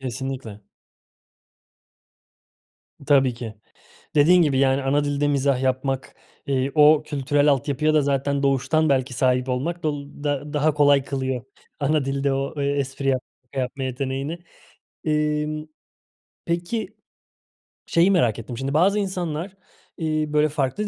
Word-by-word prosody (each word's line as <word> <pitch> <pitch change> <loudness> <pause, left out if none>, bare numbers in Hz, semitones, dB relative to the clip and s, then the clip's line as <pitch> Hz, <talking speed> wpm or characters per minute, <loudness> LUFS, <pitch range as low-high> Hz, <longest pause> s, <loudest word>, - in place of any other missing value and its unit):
kesinlikle. 130 -4 -5 2.5
Tabii 135 -4 +4
ki. 115 -2 -7 0.6
Dediğin 175 +5 +6
gibi, 145 -5 +2
yani, 135 0 +3
ana 145 +2 +2
dilde 145 0 0
mizah 140 -2 +1
yapmak, 130 0 -1 0.3
eee, 135 0 0
o 150 0 +6
kültürel 145 0 +1
altyapıya 145 +3 +1
da 155 - +4
zaten 140 0 0
doğuştan 140 +4 +2
belki 130 -1 +1
sahip 125 0 +1
olmak 160 +8 -2
dol 145 -2 -2 0.2
da 145 0 -2
daha 150 +1 +2
kolay 145 -2 +4
kılıyor 130 -2 -3 0.4
ana 145 -1 +1
dilde 135 0 0
o, 135 +1 -2
eee, 140 - 0
espri 140 -1 -2
yap 130 -1 +2 0.2
şaka 130 +2 -6
yapma 130 +1 -3
yeteneğini. 135 +5 -3 0.7
Emm, 150 0 0 0.8
peki, 185 +5 -3 0.9
şeyi 175 +4 +3
merak 120 - +2
ettim; 115 +1 -7
şimdi 135 +2 -3
bazı 195 +7 +3
insanlar, 185 -1 -3 0.4
iii, 155 -2 -1
böyle, 150 0 +3
farklı 150 +8 -1
140 Hz, 130 wpm, -23 LUFS, 135-155 Hz, 2.5 s, Dediğin